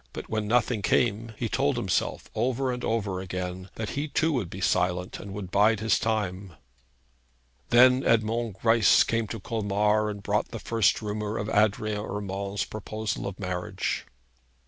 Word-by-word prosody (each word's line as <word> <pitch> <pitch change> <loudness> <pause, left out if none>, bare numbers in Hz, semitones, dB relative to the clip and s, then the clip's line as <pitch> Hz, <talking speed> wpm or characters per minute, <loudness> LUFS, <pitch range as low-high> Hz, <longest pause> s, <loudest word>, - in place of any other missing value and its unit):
But - - -7
when 110 -1 -1
nothing 120 -1 +2
came, 115 +2 +1
he - - -1
told - - +1
himself - - -1
over 130 +1 0
and 125 0 -5
over 100 -5 -1
again 90 0 -5
that 110 -1 -4
he 145 +2 -2
too 160 +2 +1
would 115 -10 -1
be 95 - -8
silent, 90 0 0
and 100 - -8
would 95 -2 -6
bide 105 +2 +4
his 110 +1 +2
time. 100 -4 -2 1.2
Then 125 +2 +6
Edmond 115 -1 +1
Greisse 115 0 +5
had - - +3
come 115 -1 0
to 110 - -5
Colmar, 105 0 +1
and 100 -1 -6
brought 105 +1 0
the 115 - -7
first 110 0 +1
rumour 105 +1 -3
of 105 - -3
Adrian 105 0 +1
Urmand's 100 0 -3
proposal 110 -1 -4
of 100 0 -6
marriage. 90 +1 -3
105 Hz, 165 wpm, -27 LUFS, 100-115 Hz, 1.2 s, Then